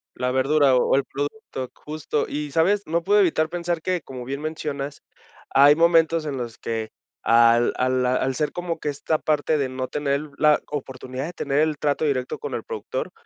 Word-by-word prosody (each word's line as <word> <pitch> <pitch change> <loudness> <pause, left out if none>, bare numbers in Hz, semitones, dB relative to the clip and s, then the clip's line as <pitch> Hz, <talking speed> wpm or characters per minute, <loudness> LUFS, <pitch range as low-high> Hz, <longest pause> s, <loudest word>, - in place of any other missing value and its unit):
La 125 0 -1
verdura 135 +1 +3
o 125 - +3
o - - +5
el 140 - +2
producto. 140 - -5
Justo, 150 -1 -3
y, 150 0 -4
¿sabes?, 190 +7 +2
no 170 +2 -1
puedo 205 +3 +4
evitar 160 -4 +2
pensar 175 -1 -2
que, 180 +1 0
como 130 -2 -8
bien 135 +2 -4
mencionas, 150 -2 -4 0.5
hay 145 +2 +6
momentos 165 -1 +3
en 140 -3 -3
los 120 -1 -5
que 110 -1 -4 0.3
al 115 +1 +5
a 130 - +1
la 130 0 +1
al 130 0 0
ser 150 +3 -1
como 175 -2 -4
que 150 - -5
esta 145 +2 -1
parte 155 0 +1
de 140 -2 0
no 130 0 -4
tener 145 +1 -1
la 150 -1 +4
oportunidad 130 -2 -5
de 170 - -6
tener 140 -3 -1
el 155 -1 +1
trato 145 +1 0
directo 130 -4 -1
con 455 - -5
el - - -3
productor, 485 +1 -5
145 Hz, 200 wpm, -23 LUFS, 130-160 Hz, 0.5 s, hay